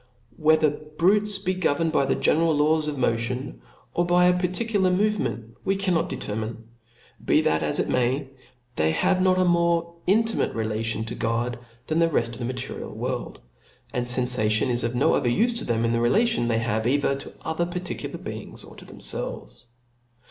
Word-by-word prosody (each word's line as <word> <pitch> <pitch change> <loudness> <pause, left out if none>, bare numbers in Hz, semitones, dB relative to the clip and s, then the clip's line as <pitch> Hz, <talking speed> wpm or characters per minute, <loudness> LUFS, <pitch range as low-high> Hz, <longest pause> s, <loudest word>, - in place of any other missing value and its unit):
Whether 155 -1 +4
brutes 185 +8 +1
be 190 -1 -1
governed 165 -3 0
by 140 - +2
the - - +1
general 160 0 +2
laws 155 +1 +2
of 150 -1 -3
motion, 125 +1 -2 0.3
or 175 - +1
by 175 0 +3
a 180 0 +3
particular 190 +2 0
movement, 180 - -1
we 195 - +1
cannot 185 -4 0
determine. 110 +2 -5 0.6
Be - - +3
that 80 0 +1
as - - 0
it - - 0
may, 130 +2 0 0.5
they 80 0 +2
have 185 - +2
not 185 0 +3
a 185 - +3
more 170 -1 +2
intimate 225 +4 +1
relation 110 0 -2
to 115 - -5
God 120 +1 -2 0.3
than 160 +1 0
the 165 0 +3
reft 120 -7 +1
of 115 - -8
the 120 - -3
material 125 +1 -5
world; - - -4 0.5
and 120 -1 -2
fenfation 125 -3 +3
is* 120 0 0
of 120 +1 -2
no - - +3
other 125 - +1
ufe 235 - +1
to - - -5
them, 115 -1 0
than 115 - +1
in - - 0
the 115 - +1
relation 210 - +2
they 115 -1 +1
have 115 -1 0
cither 140 +2 +2
toother 160 +4 -4
particular 180 0 -5
beings, - - -8
or - - -13
to - - -12
themfelves. - - -6
150 Hz, 180 wpm, -25 LUFS, 120-180 Hz, 0.6 s, Whether